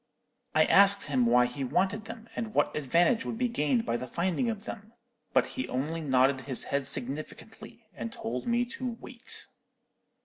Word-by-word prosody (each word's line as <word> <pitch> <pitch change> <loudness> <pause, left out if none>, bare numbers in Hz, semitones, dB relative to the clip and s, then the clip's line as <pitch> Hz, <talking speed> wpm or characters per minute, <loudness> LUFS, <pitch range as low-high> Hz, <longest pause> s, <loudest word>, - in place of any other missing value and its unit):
"I - - +6
asked 200 0 +5
him 130 -5 +1
why 125 +1 +5
he 125 +3 -4
wanted 195 - 0
them, 225 0 -9
and 220 -2 -4
what - - +2
advantage 170 - +2
would 225 - -4
be 250 +1 +1
gained 145 - +1
by 115 0 0
the 130 - -6
finding 185 - 0
of 220 -1 -5
them, 215 +2 -8 0.4
but - - +4
he 260 - -5
only 155 +6 -2
nodded 130 -2 +3
his 130 -1 -3
head 140 -1 -1
significantly, 140 +2 -5
and 115 -1 -5
told 125 +2 -5
me 240 +1 +2
to 245 -1 -5
wait. 255 -1 -4
165 Hz, 175 wpm, -29 LUFS, -, 0.4 s, I